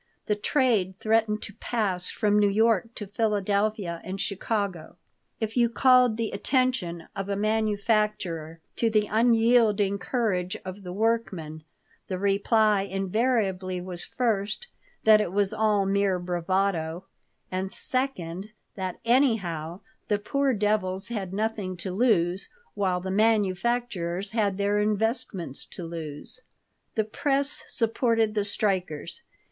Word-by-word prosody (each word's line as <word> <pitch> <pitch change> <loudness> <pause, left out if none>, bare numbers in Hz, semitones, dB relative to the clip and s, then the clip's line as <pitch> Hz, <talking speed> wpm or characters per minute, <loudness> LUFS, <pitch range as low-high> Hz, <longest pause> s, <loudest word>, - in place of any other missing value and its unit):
The 210 - +1
trade 205 -5 +1
threatened 215 -1 +1
to 210 - -8
pass 195 -6 -1
from 210 -2 +2
New 205 -1 +4
York 225 +1 +2
to 210 - -4
Philadelphia 205 -3 0
and 190 +1 -5
Chicago. 200 -3 -3 0.4
If 220 -1 -3
you 240 -2 +4
called 250 -2 +4
the 230 -1 -2
attention 250 - 0
of 195 0 -4
a 200 - 0
manufacturer 210 -6 0 0.2
to 230 - +2
the 215 -1 +2
unyielding 225 -3 +3
courage 195 -2 -1
of 185 +2 -7
the 180 -2 -7
workmen, 190 -7 -1 0.4
the 185 - -3
reply 200 +2 +3
invariably 195 -1 0
was, 180 -1 -4
first, 215 - -1 0.4
that 215 -1 +7
it 175 - -2
was 200 +1 +2
all 215 -2 +2
mere 195 -1 +2
bravado; 175 -1 -1 0.5
and, 190 +1 -2
second, 210 -8 -2 0.2
that, 185 -2 -4
anyhow, 195 - +1 0.3
the 210 - +2
poor 275 +6 0
devils 205 -2 0
had 200 -6 -4
nothing 205 -2 -2
to 185 +2 -5
lose, 195 -4 +2 0.2
while 185 -3 0
the 190 +1 -4
manufacturers 205 -2 0
had 205 -4 0
their 205 +1 +1
investments 210 - -1
to 180 - -8
lose 165 - -7 0.5
The 220 - +2
press 275 +6 -1
supported 225 -1 +1
the 210 -1 +1
strikers. 185 -7 -1
205 Hz, 125 wpm, -26 LUFS, 185-225 Hz, 0.5 s, that